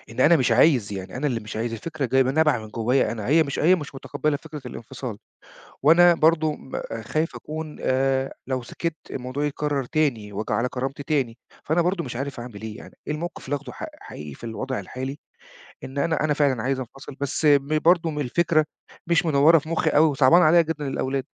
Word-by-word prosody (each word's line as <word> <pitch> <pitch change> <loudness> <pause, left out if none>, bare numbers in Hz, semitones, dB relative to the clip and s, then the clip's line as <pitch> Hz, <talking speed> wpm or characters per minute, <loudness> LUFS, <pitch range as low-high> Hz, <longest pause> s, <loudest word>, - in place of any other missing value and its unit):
إن 115 +3 -5
أنا 160 +5 +6
مش 125 -4 +2
عايز، 120 -4 +4
يعني 95 +2 -6
أنا 140 +3 -1
اللي 120 -5 -1
مش 105 0 -8
عايز، 115 +1 -2
الفكرة 145 +4 -3
جاية 130 +2 +4
ب - - -2
نابعة 150 0 +3
من 110 -1 -9
جوّايا 120 +4 +1
أنا، 110 -3 -5
هي 160 +3 +5
مش 140 -2 -4
هي 175 +4 +5
مش 150 -5 -5
متقبِّلة 145 +2 -2
فكرة 150 -1 -9
الانفصال 120 -2 -7 0.6
وأنا 170 +4 +7
برضه 160 -1 +3
م 135 - -6 0.2
خايف 155 +9 -1
أكون 155 0 -6
آآ 135 +1 +1
لو 130 -2 -2
سِكِت 165 +6 -4
الموضوع 130 +3 -3
يتكرّر 145 -1 -1
تاني 120 -8 -1
وآجي 105 +2 -3
على 115 +4 +1
كرامتي 135 +3 -4
تاني، 135 -5 -1 0.3
فأنا 160 +3 +2
برضه 180 0 0
مش 125 -3 -6
عارف 135 -1 -4
أعمل 115 -4 -9
إيه 110 -1 -6
يعني - - -12
إيه - - -1
الموقف 170 +3 -6
اللي 145 +2 -1
آخده 140 -3 -9
ح - - -7 0.2
حقيقي 75 -1 -9
في - - -13
الوضع 130 +3 -3
الحالي؟ 130 +3 -6 0.7
إن 135 +2 -7
أنا 160 +1 +1
أنا 150 - +2
فعلًا 140 -6 +1
عايز 135 +1 0
أنفصل، 135 +3 -9
بس 140 +2 -2
م 145 +1 +4
برضه 170 +1 +3
الفكرة 155 +4 +2 0.4
مش 170 0 +2
منوّرة 155 +2 +6
في 155 +1 -9
مُخّي 165 - +1
أوي، 155 +2 +5
وصعبانة 145 +5 +5
عليّا 170 +2 +6
جدًا 155 -3 -4
الأولاد. 135 -1 -2
140 Hz, 205 wpm, -24 LUFS, 125-155 Hz, 0.7 s, وأنا